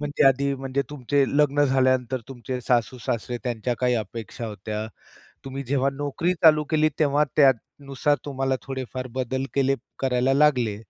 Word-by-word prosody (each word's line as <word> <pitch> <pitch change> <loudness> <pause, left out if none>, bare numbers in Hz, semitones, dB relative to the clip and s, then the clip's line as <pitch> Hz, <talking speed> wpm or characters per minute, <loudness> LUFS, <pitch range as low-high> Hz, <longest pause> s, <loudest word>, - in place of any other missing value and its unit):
म्हणजे 145 0 0
आधी, 140 +1 +3
म्हणजे 135 +1 -2
तुमचे 140 0 +1
लग्न 145 0 +3
झाल्यानंतर 130 -2 +1
तुमचे 125 -1 -5
सासू-सासरे 120 0 -1
त्यांच्या 120 0 -2
काही 125 -1 +2
अपेक्षा 115 +1 -5
होत्या. 105 +1 -5 0.6
तुम्ही 135 0 -5
जेव्हा 135 +1 +1
नोकरी 145 +5 -1
चालू 155 -2 +6
केलीत, 155 -1 +3
तेव्हा 150 -1 +3
त्यानुसार 140 +1 +2
तुम्हाला 135 -2 -1
थोडेफार 130 -1 -5
बदल 130 +1 -1
केले 135 0 +2 0.2
करायला 130 0 +1
लागले. 130 -7 +3
135 Hz, 140 wpm, -24 LUFS, 125-140 Hz, 0.6 s, चालू